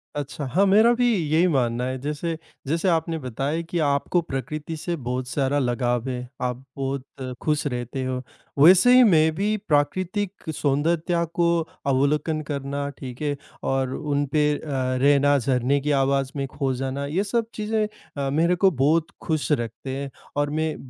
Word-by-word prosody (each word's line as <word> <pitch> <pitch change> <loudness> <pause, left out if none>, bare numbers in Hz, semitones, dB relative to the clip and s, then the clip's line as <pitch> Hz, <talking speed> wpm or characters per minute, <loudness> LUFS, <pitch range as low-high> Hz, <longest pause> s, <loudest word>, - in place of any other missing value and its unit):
अच्छा, 145 0 -4
हाँ, 170 +10 +2
मेरा 220 +5 +6
भी 245 0 +2 0.2
यही 165 +4 +4
मानना 125 -6 +1
है। 130 0 -2
जैसे 150 +3 -3 0.3
जैसे 165 +6 0
आपने 165 -1 0
बताया 135 +5 -2
कि 175 - -1
आपको 155 +5 +1
प्रकृति 150 +2 -5
से 170 +3 -3
बहुत 125 -3 -3
सारा 140 +1 0
लगाव 120 -1 0
है, 125 -1 -4
आप 125 +1 -2
बहुत 135 -1 -4
खुश 150 -1 0
रहते 125 0 -3
हो। 130 0 -2 0.4
वैसे 185 - +7
ही 255 - +8
मैं 160 -7 +5
भी 210 +3 0
प्राकृतिक 185 +5 -1
सौंदर्यता 165 +4 +1
को 170 - +2 0.4
अवलोकन 150 +3 +1
करना 140 0 -3
ठीक 125 0 -8
है, 145 -1 0 0.3
और 135 -1 0
उन 145 -1 -1
पे 150 -1 +4
अ - - -11 0.4
रहना, 145 0 +5
झरने 130 +1 +1
की 150 +2 -1
आवाज़ 135 0 +1
में 140 -1 -1
खो 135 0 -2
जाना, 135 +2 -3
ये 165 +8 0
सब 230 +3 0
चीज़ें 215 0 0 0.3
अ, 140 -1 -1
मेरे 165 +5 +2
को 190 +2 +4
बहुत 155 +3 +2
खुश 155 -2 -1
रखते 120 0 -2
हैं, 140 0 -4 0.3
और 145 0 +1
मैं, 155 +1 -1
145 Hz, 165 wpm, -24 LUFS, 135-165 Hz, 0.4 s, ही